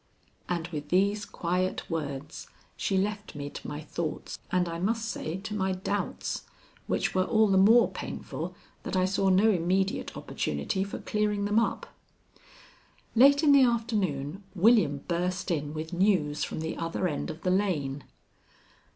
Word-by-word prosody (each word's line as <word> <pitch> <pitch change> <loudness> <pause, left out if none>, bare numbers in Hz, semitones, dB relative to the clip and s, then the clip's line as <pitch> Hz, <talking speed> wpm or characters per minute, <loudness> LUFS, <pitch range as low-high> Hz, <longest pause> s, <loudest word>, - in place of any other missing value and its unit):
And 170 -2 -1
with 150 -3 -6
these 200 +3 +2
quiet 180 +2 -2
words 150 -2 -5 0.3
she 195 - 0
left 205 0 -2
me 145 0 -5
to - - -8
my 150 +1 -5
thoughts, 155 +1 -5
and 180 -1 +2
I 165 0 -4
must 225 +5 0
say 175 -6 -3
to 210 +2 -6
my 190 -2 0
doubts, 195 +2 -3 0.4
which - - 0
were 185 - +3
all 220 +1 +4
the 190 -1 +4
more 225 +5 +7
painful - - -6 0.3
that - - -4
I 185 0 +3
saw 195 +1 +1
no 195 +4 +5
immediate 190 +2 0
opportunity 75 - -2
for 200 - -5
clearing 210 -1 -1
them 210 +2 +3
up. 230 - -1 1.3
Late 280 +5 +6
in 295 - +6
the 280 -1 +7
afternoon 205 - 0
William 185 - +4
burst 180 +2 -1
in 145 -3 -1
with 155 +3 -5
news 175 -6 +2
from - - -4
the 160 0 -3
other 165 +2 -1
end 150 -4 -3
of 160 0 -7
the 180 - +2
lane. 150 -9 0
185 Hz, 160 wpm, -28 LUFS, 160-205 Hz, 1.3 s, more